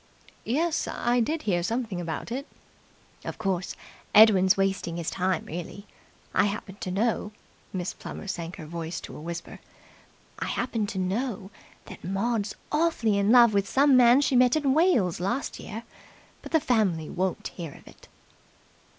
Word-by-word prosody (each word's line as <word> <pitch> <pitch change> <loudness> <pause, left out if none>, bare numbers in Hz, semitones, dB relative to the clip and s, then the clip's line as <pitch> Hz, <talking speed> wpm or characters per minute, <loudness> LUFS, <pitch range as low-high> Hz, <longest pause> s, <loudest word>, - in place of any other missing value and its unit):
"Yes, 315 +7 0
I 240 +1 0
did 305 +7 -1
hear 175 -4 +1
something 220 -1 -2
about 165 +6 -5
it." 270 +4 -4 0.8
"Of - - -6
course, 190 -4 -2 0.4
Edwin's 200 -3 +7
wasting 195 -3 0
his 170 -2 -3
time, 185 -2 -1
really. 175 +5 -7 0.5
I - - +4
happen 200 -1 -4
to - - -4
know" 210 +2 0 0.4
Miss 185 -1 -3
Plummer - - -8
sank 170 -2 -4
her 160 - -9
voice 165 +1 -5
to - - -9
a - - -9
whisper 170 +1 -7 0.8
"I - - -2
happen 230 -4 -1
to 200 - -5
know 195 +2 -2 0.3
that - - -11
Maud's 200 +3 -1 0.2
awfully 300 -10 +2
in 200 +2 +3
love 235 -3 +7
with 200 -1 +1
some 275 0 +5
man 250 +2 +7
she 275 - +1
met 250 +1 +5
in 285 -4 +2
Wales 265 - +3
last 235 +10 -2
year, 225 +2 -7 0.6
but - - -10
the 320 - +4
family 200 - +1
won't 185 0 -2
hear 165 -5 -7
of - - -17
it." - - -16
205 Hz, 160 wpm, -27 LUFS, 180-245 Hz, 0.8 s, Edwin's